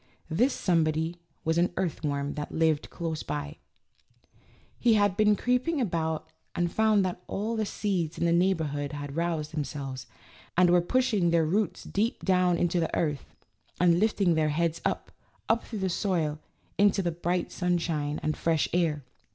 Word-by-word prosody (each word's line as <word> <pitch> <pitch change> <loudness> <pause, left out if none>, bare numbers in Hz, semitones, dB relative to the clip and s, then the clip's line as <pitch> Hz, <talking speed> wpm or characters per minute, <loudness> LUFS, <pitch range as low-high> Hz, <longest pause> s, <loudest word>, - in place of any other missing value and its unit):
This 245 - +3
somebody 165 -2 0 0.3
was 160 +1 +2
an 175 - +2
earthworm 145 -5 -1
that 150 -1 -5
lived 160 -2 +1
close 160 -2 -4
by. 150 +1 -5 1.2
He 235 -2 +4
had 205 -2 +3
been 210 0 +4
creeping 250 - 0
about 165 - -1 0.3
and 175 -1 0
found 215 -3 +3
that 180 -1 -3
all 220 +3 -2
the 215 -2 -1
seeds 180 -8 -2
in 170 - 0
the 170 - +3
neighborhood 160 -5 +1
had 145 -1 -6
roused 165 -2 -2
themselves, 140 -3 -4 0.5
and 180 -1 +5
were 175 0 +5
pushing 215 -3 +2
their 165 -1 +3
roots 185 +2 0
deep 220 +4 -2
down 180 -2 +3
into 175 +1 +1
the 165 - -1
earth, 150 -4 -2 0.4
and 175 -1 +4
lift 215 +2 +1
ing 180 -4 +4
their 155 -1 +2
heads 165 +2 0
up, - - -2 0.4
up 225 +1 +1
through 225 - -5
the 190 -1 -1
soil 170 -5 -1 0.4
into 200 -1 +4
the 175 - 0
bright 175 +2 -2
sunshine 165 -5 -1
and 155 - 0
fresh 165 -2 +1
air. 160 -5 +1
170 Hz, 165 wpm, -28 LUFS, 155-195 Hz, 1.2 s, and